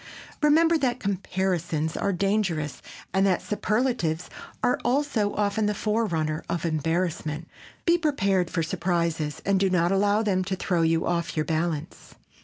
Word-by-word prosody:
Remember 320 Hz, +2 st, +4 dB
that 255 Hz, -3 st, 0 dB
comparisons 180 Hz, -5 st, -1 dB
are 200 Hz, -, 0 dB
dangerous 190 Hz, -5 st, -1 dB, 0.3 s
and 190 Hz, 0 st, +3 dB
that 185 Hz, -, +2 dB
superlatives 210 Hz, -7 st, -1 dB, 0.3 s
are 245 Hz, -, +2 dB
also 245 Hz, -5 st, +1 dB
often 210 Hz, +1 st, +1 dB
the 210 Hz, -, 0 dB
forerunner 170 Hz, -9 st, -1 dB
of 170 Hz, -1 st, -2 dB
embarrassment. 160 Hz, 0 st, -1 dB, 0.4 s
Be 345 Hz, 0 st, +4 dB
prepared 195 Hz, -, +1 dB
for 165 Hz, -, -1 dB
surprises 165 Hz, -2 st, -1 dB
and 195 Hz, -1 st, +3 dB
do 195 Hz, 0 st, +2 dB
not 175 Hz, -1 st, +2 dB
allow 205 Hz, +2 st, +3 dB
them 190 Hz, -3 st, +1 dB
to 190 Hz, 0 st, -1 dB
throw 180 Hz, -2 st, 0 dB
you 165 Hz, 0 st, +2 dB
off 170 Hz, -1 st, -1 dB
your 155 Hz, -, +1 dB
balance. 160 Hz, -1 st, -3 dB
185 Hz, 145 wpm, -26 LUFS, 165-210 Hz, 0.4 s, Remember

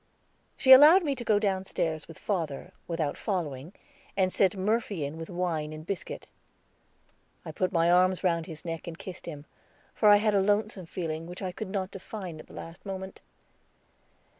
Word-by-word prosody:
She 265 Hz, -, +4 dB
allowed 305 Hz, +8 st, +10 dB
me 290 Hz, -3 st, 0 dB
to 250 Hz, -3 st, -6 dB
go 215 Hz, -3 st, +3 dB
downstairs 190 Hz, -6 st, -1 dB
with 165 Hz, -, -12 dB
father, 165 Hz, -9 st, -3 dB, 0.2 s
without 165 Hz, -4 st, -2 dB
following, 160 Hz, -, -3 dB, 0.5 s
and 185 Hz, -1 st, +2 dB
sent 195 Hz, 0 st, +2 dB
Murphy 200 Hz, -4 st, 0 dB
in 145 Hz, +2 st, -5 dB
with 165 Hz, 0 st, -7 dB
wine 170 Hz, -4 st, -2 dB
and 155 Hz, 0 st, -8 dB
biscuit. 190 Hz, -1 st, -5 dB, 1.2 s
I -, -, -5 dB
put 185 Hz, +3 st, -1 dB
my 170 Hz, -1 st, +3 dB
arms 185 Hz, +1 st, +3 dB
round 170 Hz, -3 st, +1 dB
his 160 Hz, -1 st, -9 dB
neck 165 Hz, 0 st, -5 dB
and 165 Hz, -1 st, -6 dB
kissed 180 Hz, -1 st, -9 dB
him, 150 Hz, -3 st, -7 dB, 0.5 s
for 210 Hz, -, +4 dB
I 205 Hz, -, +9 dB
had 210 Hz, +1 st, +2 dB
a 200 Hz, -, +4 dB
lonesome 205 Hz, -2 st, 0 dB
feeling, 165 Hz, -2 st, -4 dB
which 180 Hz, +2 st, -8 dB
I 185 Hz, -, -2 dB
could 190 Hz, +2 st, -6 dB
not 190 Hz, -1 st, -3 dB
define 185 Hz, -4 st, -7 dB
at -, -, -12 dB
the -, -, -15 dB
last 165 Hz, +2 st, -9 dB
moment. 190 Hz, -1 st, -7 dB
180 Hz, 180 wpm, -28 LUFS, 165-200 Hz, 1.2 s, allowed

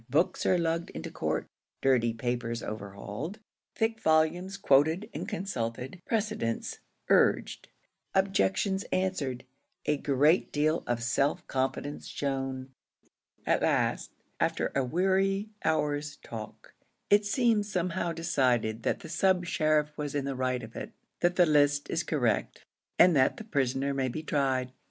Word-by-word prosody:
Books 155 Hz, +7 st, +1 dB
are 185 Hz, -, +4 dB
lugged 165 Hz, 0 st, -1 dB
into -, -, -6 dB
court -, -, -2 dB, 0.4 s
dirty 125 Hz, -3 st, +3 dB
papers 115 Hz, 0 st, -3 dB
overhauled 105 Hz, -, -6 dB, 0.4 s
thick 225 Hz, 0 st, 0 dB
volumes 175 Hz, +4 st, +2 dB
quoted 160 Hz, +4 st, +3 dB
and -, -, -5 dB
consulted 135 Hz, -, -4 dB
precedents 210 Hz, -, -2 dB, 0.3 s
urged -, -, +2 dB, 0.5 s
objections 195 Hz, 0 st, +2 dB
answered 155 Hz, -10 st, -1 dB, 0.4 s
a 150 Hz, -, +2 dB
great 145 Hz, +5 st, +3 dB
deal 155 Hz, +2 st, +1 dB
of 120 Hz, -1 st, -1 dB
self 135 Hz, +4 st, +1 dB
confidence 135 Hz, +2 st, -2 dB
shown. 135 Hz, -1 st, -3 dB, 0.8 s
At -, -, +2 dB
last, -, -, +1 dB, 0.3 s
after -, -, 0 dB
a 135 Hz, -, +1 dB
weary 195 Hz, -, +1 dB
hour's 150 Hz, -2 st, 0 dB
talk, 110 Hz, -2 st, -9 dB, 0.4 s
it 205 Hz, +1 st, +6 dB
seems 210 Hz, -1 st, +1 dB
somehow 180 Hz, -1 st, -1 dB
decided 125 Hz, -9 st, +1 dB
that -, -, -1 dB
the -, -, -9 dB
sub 185 Hz, +1 st, +2 dB
sheriff 155 Hz, -2 st, +1 dB
was 145 Hz, -1 st, -3 dB
in 140 Hz, -1 st, -1 dB
the 140 Hz, -, -2 dB
right 130 Hz, -1 st, -1 dB
of 110 Hz, +1 st, -10 dB
it -, -, -6 dB, 0.3 s
that 175 Hz, 0 st, +2 dB
the 180 Hz, -, +6 dB
list 145 Hz, -2 st, +3 dB
is 165 Hz, -, +1 dB
correct, 125 Hz, -, -1 dB, 0.3 s
and 180 Hz, -2 st, +7 dB
that 130 Hz, -2 st, +3 dB
the -, -, -7 dB
prisoner 140 Hz, -, 0 dB
may 135 Hz, -1 st, 0 dB
be 155 Hz, +6 st, -4 dB
tried. 130 Hz, -4 st, 0 dB
150 Hz, 135 wpm, -29 LUFS, 130-180 Hz, 0.8 s, and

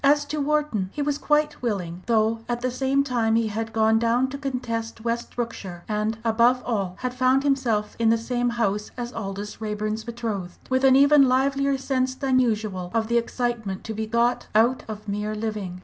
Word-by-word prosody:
As 290 Hz, +1 st, +4 dB
to 300 Hz, -, -1 dB
Wharton 290 Hz, -10 st, 0 dB
he 290 Hz, -, -2 dB
was 290 Hz, 0 st, -1 dB
quite 295 Hz, 0 st, +1 dB
willing, 185 Hz, -7 st, -3 dB
though 225 Hz, -1 st, +2 dB
at 240 Hz, 0 st, -1 dB
the 255 Hz, 0 st, 0 dB
same 270 Hz, +2 st, +1 dB
time 235 Hz, -5 st, +1 dB
he 225 Hz, -1 st, +2 dB
had 225 Hz, +2 st, -3 dB
gone 220 Hz, 0 st, +3 dB
down 235 Hz, +3 st, +2 dB
to 280 Hz, -, -5 dB
contest 230 Hz, -5 st, -3 dB
West 235 Hz, 0 st, -3 dB
Brookshire, 195 Hz, -7 st, -5 dB
and, 215 Hz, +1 st, -1 dB
above 235 Hz, +3 st, +3 dB
all, 195 Hz, -6 st, -1 dB
had 250 Hz, -1 st, -2 dB
found 255 Hz, +2 st, +3 dB
himself 245 Hz, -7 st, 0 dB
in 230 Hz, -1 st, +3 dB
the 230 Hz, -, +4 dB
same 245 Hz, +1 st, -1 dB
house 210 Hz, -3 st, -1 dB
as 240 Hz, 0 st, -5 dB
Aldous 205 Hz, 0 st, -6 dB
Raeburn's 215 Hz, 0 st, -2 dB
betrothed, 220 Hz, -6 st, -4 dB
with 260 Hz, +1 st, +2 dB
an 265 Hz, -1 st, +6 dB
even 280 Hz, -1 st, +6 dB
livelier 275 Hz, +1 st, +2 dB
sense 260 Hz, -1 st, -1 dB
than 260 Hz, -1 st, +2 dB
usual 210 Hz, -7 st, -1 dB
of 225 Hz, 0 st, +1 dB
the 235 Hz, 0 st, +4 dB
excitement 235 Hz, -5 st, -3 dB
to 220 Hz, -, -5 dB
be 220 Hz, 0 st, -3 dB
got 235 Hz, +2 st, +1 dB
out 235 Hz, +4 st, +3 dB
of 215 Hz, -1 st, -7 dB
mere 210 Hz, +1 st, -2 dB
living. 210 Hz, -4 st, -4 dB
230 Hz, 195 wpm, -24 LUFS, 215-260 Hz, -, an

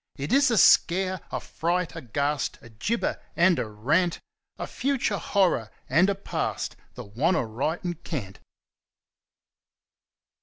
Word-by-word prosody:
It 140 Hz, -, -3 dB
is 275 Hz, 0 st, +5 dB
a 230 Hz, -, +2 dB
Scare, 185 Hz, 0 st, +4 dB
a -, -, -2 dB
Fright, 170 Hz, +1 st, -2 dB
a 165 Hz, -, -6 dB
Ghast, 140 Hz, +3 st, -1 dB
a 115 Hz, -, -14 dB
Gibber, 210 Hz, -, -2 dB
and 175 Hz, 0 st, +4 dB
a -, -, -2 dB
Rant, 150 Hz, -, +1 dB, 0.4 s
A -, -, -4 dB
future 260 Hz, -7 st, -1 dB
Horror 180 Hz, -, +1 dB, 0.2 s
and 185 Hz, +4 st, +4 dB
a 200 Hz, -, +1 dB
Past, 200 Hz, -, -3 dB, 0.2 s
the -, -, -7 dB
Wantaritencant! 145 Hz, -, -2 dB
170 Hz, 120 wpm, -26 LUFS, 135-190 Hz, 0.4 s, is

